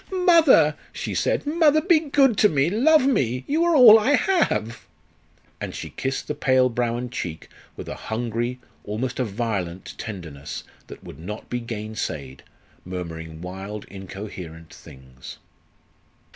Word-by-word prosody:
"Mother!" 320 - +6 0.2
she - - -5
said. - - 0
"Mother, 310 0 +4
be 330 0 +4
good 275 -5 +3
to 210 - +6
me 145 +1 +1
love 275 +7 +4
me 130 - +1
you 310 +4 +1
are 340 -1 +3
all 230 -5 +9
I 270 +7 +3
have!" 120 - 0 0.7
And - - -5
she - - -7
kissed 135 0 -3
the - - -2
pale 130 -3 +3
brow 120 0 -1
and 125 0 -5
cheek 85 -8 -6 0.3
with - - -8
a - - -4 0.2
hungry, 120 +2 -2 0.2
almost 120 +5 -4
a - - +2
violent 100 -5 -4
tenderness 85 -10 -7 0.2
that - - -12
would 70 - -11
not 105 +6 -8
be 125 - -1
gainsaid, 110 - -5 0.4
murmuring 80 -3 -7
wild 95 +4 -7
incoherent 95 -4 -9
things. 65 -1 -13
120 Hz, 145 wpm, -23 LUFS, -, 0.7 s, all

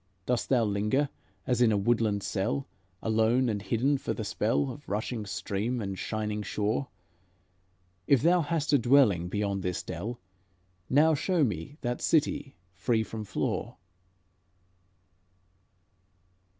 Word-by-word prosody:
Dost 125 -1 0
thou 125 -3 +4
linger 105 +7 +1 0.4
as 125 -1 +1
in 115 -2 +5
a 105 - +2
woodland 105 -1 +1
cell, 105 +7 -1 0.4
Alone 110 +3 +2
and 105 -2 -2
hidden, 125 +8 +1
for - - -3
the 110 - -4
spell 115 +6 0
Of 145 +3 -11
rushing 105 +1 -3
stream 100 +6 -2
and 100 -3 -3
shining 105 +2 -3
shaw? 105 +5 -1 1.2
If 140 -2 +4
thou 175 +2 +5
hast 160 -1 -1
a 145 - +6
dwelling 115 -9 +4
beyond 100 -1 -1
this 90 -1 -2
dell, 120 +3 -5 0.7
Now 155 +4 +5
show 170 +2 +1
me 110 - -3
that 120 0 -2
city 145 -3 +1 0.2
free 110 +4 +1
from 110 -1 -6
flaw." - - -2
115 Hz, 130 wpm, -29 LUFS, 105-135 Hz, 1.2 s, a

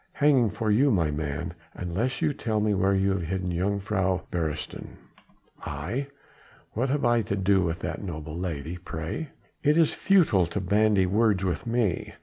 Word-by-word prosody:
"Hanging 140 -6 +4
for 105 +1 -1
you, 130 +7 +4
my 85 - +2
man, 75 -1 -3 0.2
unless 105 - -2
you 155 -2 +2
tell 110 -5 -1
me 105 0 +2
where 95 0 +2
you 95 0 +2
have 95 -1 -1
hidden 90 +2 -2
Jongejuffrouw 95 +1 -1
Beresteyn." 80 -3 -4 0.7
"I? 100 - -3 0.7
What 125 +5 0
have 140 0 0
I 120 -1 +4
to 100 -1 -2
do 95 0 +3
with 85 +1 -2
that - - -4
noble 80 -4 -6
lady, 85 -1 -4
pray?" 80 - -4 0.3
"It 150 +2 +3
is 165 -2 +4
futile 150 - +3
to 100 - -3
bandy 100 +1 +3
words 100 0 +2
with 95 +5 -2
me. 115 -6 -1
95 Hz, 165 wpm, -27 LUFS, 90-115 Hz, 0.7 s, Hanging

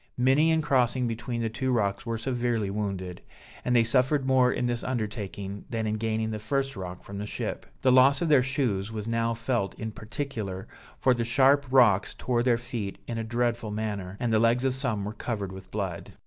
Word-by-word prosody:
Many 135 +6 +4
in 160 -1 +2
crossing 125 -3 +2
between 115 +1 -3
the - - +1
two 130 +3 -1
rocks 100 -1 0
were 115 0 -1
severely 120 -3 -1
wounded; 95 -4 -4 0.4
and 125 - +1
they 115 - +6
suffered 130 +4 +2
more 130 -1 +4
in - - -1
this 120 -1 -1
undertaking 105 -4 -4
than 115 -2 -2
in 105 - 0
gaining 110 0 -1
the 110 - -3
first 135 +4 -1
rock 90 -2 -7
from 100 0 -7
the 105 - -4
ship. - - -4 0.2
The 130 - +5
loss 130 +2 +6
of 170 - 0
their 145 -4 +6
shoes 125 -6 -1
was 110 -1 -5
now 115 0 0
felt 115 -3 -1
in 110 0 -5
particular, 110 -4 -5 0.3
for 130 - +3
the 120 -1 -1
sharp 135 +4 +4
rocks 120 -7 +4
tore 120 -2 0
their 120 -1 +3
feet 115 -5 -5
in 115 -1 -4
a - - -2
dreadful 120 0 -1
manner, 105 -3 -4
and 120 -2 0
the 110 - +4
legs 115 +2 +3
of 130 - +2
some 120 -7 -1
were 105 - -4
covered 105 -5 -4
with 95 0 -10
blood. 95 -5 -4
115 Hz, 205 wpm, -27 LUFS, 105-130 Hz, 0.4 s, they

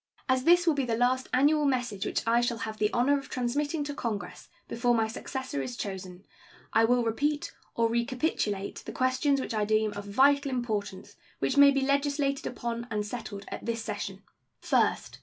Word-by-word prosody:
As 260 0 +1
this 350 +1 +6
will 330 - +4
be 280 -2 0
the 230 -2 -1
last 255 +2 +1
annual 295 +4 +3
message 245 -7 0
which - - -2
I 230 +1 +3
shall 240 -1 0
have 220 -1 -6
the 210 0 +2
honor 280 +4 +3
of 275 - -12
transmitting 290 +5 -1
to 290 0 -4
Congress 225 -7 -5 0.2
before 240 0 +1
my 225 -1 +2
successor 260 - -4
is 125 -3 -5
chosen, 190 -1 -6 0.5
I 225 - +5
will 245 +1 +3
repeat 290 +6 -1 0.2
or 230 0 +3
recapitulate 235 -4 -1
the - - -5
questions 260 +2 +1
which 260 - -4
I 215 -1 +1
deem 215 0 +1
of 205 0 -7
vital 280 +7 +3
importance 220 -7 -3 0.2
which - - -1
may 285 0 +8
be 275 -1 +2
legislated 280 0 0
upon 235 0 -4
and 210 -2 -2
settled 205 -3 -6
at - - -7
this 230 -1 -2
session: 200 -2 -5 0.4
First. - - 0
240 Hz, 185 wpm, -28 LUFS, 215-275 Hz, 0.5 s, may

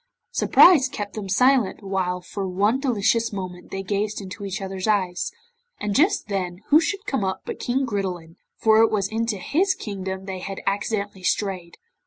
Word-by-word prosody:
Surprise 295 -7 +6
kept 205 -4 -5
them 205 -3 -6
silent 250 0 +3
while 185 -2 -1
for 195 +2 -5
one 205 +7 +1
delicious 230 -3 +1
moment 185 -3 -6
they 195 0 -4
gazed 205 +2 -1
into 195 +1 -8
each 195 -1 -3
other's 195 0 -4
eyes, 185 -4 0 0.5
and 210 -1 -2
just 345 - +2
then 185 -2 -3
who 300 - +7
should 400 +5 -2
come 270 -7 -1
up 190 0 -2
but - - -5
King 265 +2 0
Gridelin, 185 -7 -4 0.2
for 220 0 +5
it 225 - +5
was 200 -3 0
into 225 -1 -1
his 370 - +1
kingdom 190 - -5
they 190 -1 -5
had 195 +1 -6
accidentally 200 -1 -2
strayed. 185 -2 -2
200 Hz, 175 wpm, -23 LUFS, 190-225 Hz, 0.5 s, who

